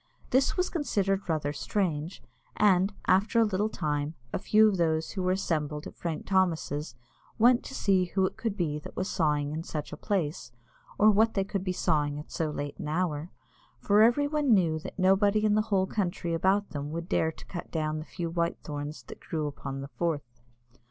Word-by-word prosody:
This 265 Hz, +7 st, +3 dB
was 365 Hz, -, 0 dB
considered 200 Hz, -, 0 dB
rather 150 Hz, -3 st, 0 dB
strange, 165 Hz, -1 st, -2 dB, 0.3 s
and, 195 Hz, -1 st, +4 dB
after 200 Hz, +5 st, +3 dB
a -, -, +6 dB
little 210 Hz, +1 st, 0 dB
time, 150 Hz, -4 st, -2 dB, 0.2 s
a -, -, 0 dB
few 215 Hz, +3 st, +5 dB
of 200 Hz, -3 st, +1 dB
those 160 Hz, -2 st, +1 dB
who 190 Hz, -, -3 dB
were 185 Hz, 0 st, +2 dB
assembled 150 Hz, -5 st, -2 dB
at -, -, -9 dB
Frank 165 Hz, -3 st, -4 dB
Thomas's 165 Hz, -7 st, 0 dB, 0.4 s
went 240 Hz, +2 st, +5 dB
to 270 Hz, -, -7 dB
see 190 Hz, -6 st, +2 dB
who 190 Hz, +2 st, +1 dB
it -, -, -3 dB
could 225 Hz, -4 st, -3 dB
be 150 Hz, -4 st, -1 dB
that -, -, -11 dB
was 185 Hz, -, -2 dB
sawing 150 Hz, -6 st, 0 dB
in 155 Hz, +1 st, -3 dB
such 150 Hz, -2 st, -5 dB
a -, -, -6 dB
place, 170 Hz, -10 st, -2 dB, 0.5 s
or 215 Hz, +1 st, +6 dB
what 220 Hz, +2 st, +3 dB
they 195 Hz, -, +2 dB
could 195 Hz, -1 st, -3 dB
be 185 Hz, -, -1 dB
sawing 150 Hz, -4 st, 0 dB
at 150 Hz, -, -9 dB
so 160 Hz, -2 st, -1 dB
late 145 Hz, -1 st, -5 dB
an -, -, -4 dB
hour, 160 Hz, -1 st, -1 dB, 0.5 s
for 205 Hz, +1 st, +4 dB
every 240 Hz, +6 st, +4 dB
one 290 Hz, -5 st, +3 dB
knew 165 Hz, -5 st, +2 dB
that -, -, -9 dB
nobody 200 Hz, +3 st, +3 dB
in 210 Hz, -, +3 dB
the 215 Hz, -, +4 dB
whole 190 Hz, -2 st, +3 dB
country 175 Hz, -4 st, -2 dB
about 195 Hz, +4 st, +1 dB
them 145 Hz, -1 st, -4 dB
would 165 Hz, +2 st, -5 dB
dare 160 Hz, -2 st, +1 dB
to -, -, -14 dB
cut 175 Hz, -, -7 dB
down 155 Hz, -1 st, -2 dB
the -, -, -5 dB
few 170 Hz, -1 st, -5 dB
white 170 Hz, 0 st, 0 dB
thorns 145 Hz, 0 st, -6 dB
that -, -, -11 dB
grew 155 Hz, -2 st, -3 dB
upon 140 Hz, -1 st, -5 dB
the 140 Hz, -, -6 dB
Forth. 145 Hz, -7 st, -3 dB
175 Hz, 205 wpm, -28 LUFS, 155-200 Hz, 0.5 s, a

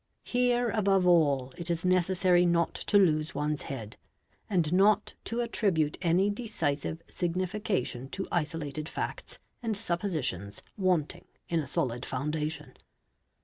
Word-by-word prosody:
Here 245 Hz, -1 st, +1 dB
above 195 Hz, -3 st, +2 dB
all 145 Hz, -7 st, +3 dB
it 170 Hz, 0 st, -3 dB
is 170 Hz, +1 st, -1 dB
necessary 185 Hz, 0 st, +3 dB
not 170 Hz, -1 st, +2 dB
to 205 Hz, -, +1 dB
lose 155 Hz, -6 st, +3 dB
one's 150 Hz, +1 st, -1 dB
head 115 Hz, -6 st, -7 dB, 0.5 s
and 175 Hz, -5 st, +1 dB
not 205 Hz, +3 st, +4 dB
to 235 Hz, +1 st, -1 dB
attribute 190 Hz, -10 st, +1 dB
any 185 Hz, +3 st, +3 dB
decisive 165 Hz, -, -2 dB
signification 180 Hz, -, -2 dB
to 190 Hz, -, -4 dB
isolated 155 Hz, -2 st, -2 dB
facts -, -, -4 dB, 0.2 s
and 225 Hz, -3 st, -1 dB
suppositions 160 Hz, -, -2 dB
wanting 175 Hz, -3 st, 0 dB, 0.2 s
in 170 Hz, -, +1 dB
a 150 Hz, -, -3 dB
solid 125 Hz, -6 st, -1 dB
foundation. 150 Hz, +1 st, -3 dB
170 Hz, 125 wpm, -29 LUFS, 150-195 Hz, 0.5 s, not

